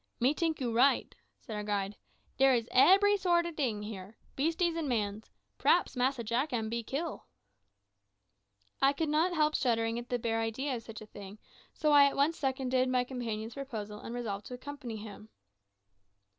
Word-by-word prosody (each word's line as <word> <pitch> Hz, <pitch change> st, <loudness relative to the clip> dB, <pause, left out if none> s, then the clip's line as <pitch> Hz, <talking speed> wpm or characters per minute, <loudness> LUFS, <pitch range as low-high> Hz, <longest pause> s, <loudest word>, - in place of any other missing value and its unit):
"Me 255 Hz, +4 st, +3 dB
tink 325 Hz, 0 st, -1 dB
you 240 Hz, -4 st, -2 dB
right," 255 Hz, +5 st, +3 dB, 0.2 s
said 220 Hz, -, -8 dB
our 210 Hz, -, -3 dB
guide; 205 Hz, -1 st, -2 dB, 0.4 s
"dere 270 Hz, -1 st, +5 dB
is 230 Hz, -1 st, -1 dB
ebery 390 Hz, +9 st, +6 dB
sort 350 Hz, -3 st, +2 dB
ob 340 Hz, -2 st, -5 dB
ting 230 Hz, -9 st, -1 dB
here 210 Hz, 0 st, -8 dB, 0.2 s
beasties 330 Hz, +4 st, +1 dB
and 320 Hz, -4 st, -2 dB
mans. 215 Hz, -2 st, -2 dB, 0.3 s
P'raps -, -, +3 dB
Massa 250 Hz, 0 st, 0 dB
Jack 240 Hz, +7 st, -1 dB
am 225 Hz, -3 st, -1 dB
be 235 Hz, +1 st, -2 dB
kill." 295 Hz, +8 st, -5 dB, 1.5 s
I 275 Hz, +1 st, +5 dB
could 310 Hz, +2 st, -2 dB
not 315 Hz, +4 st, +2 dB
help 305 Hz, -1 st, +2 dB
shuddering 230 Hz, -2 st, +1 dB
at 240 Hz, -, -10 dB
the 245 Hz, -, 0 dB
bare 225 Hz, -1 st, -1 dB
idea 255 Hz, +5 st, -2 dB
of 235 Hz, -, -5 dB
such 225 Hz, -1 st, -10 dB
a -, -, -9 dB
thing, 205 Hz, -1 st, -11 dB, 0.4 s
so 305 Hz, -1 st, +1 dB
I 285 Hz, -1 st, +8 dB
at 280 Hz, -, +1 dB
once 295 Hz, +4 st, +1 dB
seconded 260 Hz, -2 st, 0 dB
my 250 Hz, -1 st, +2 dB
companion's 230 Hz, -3 st, -5 dB
proposal, 220 Hz, -7 st, -6 dB
and 235 Hz, -, -7 dB
resolved 210 Hz, -4 st, -4 dB
to 250 Hz, -, -6 dB
accompany 255 Hz, -3 st, -7 dB
him. 210 Hz, 0 st, -10 dB
250 Hz, 180 wpm, -31 LUFS, 225-285 Hz, 1.5 s, I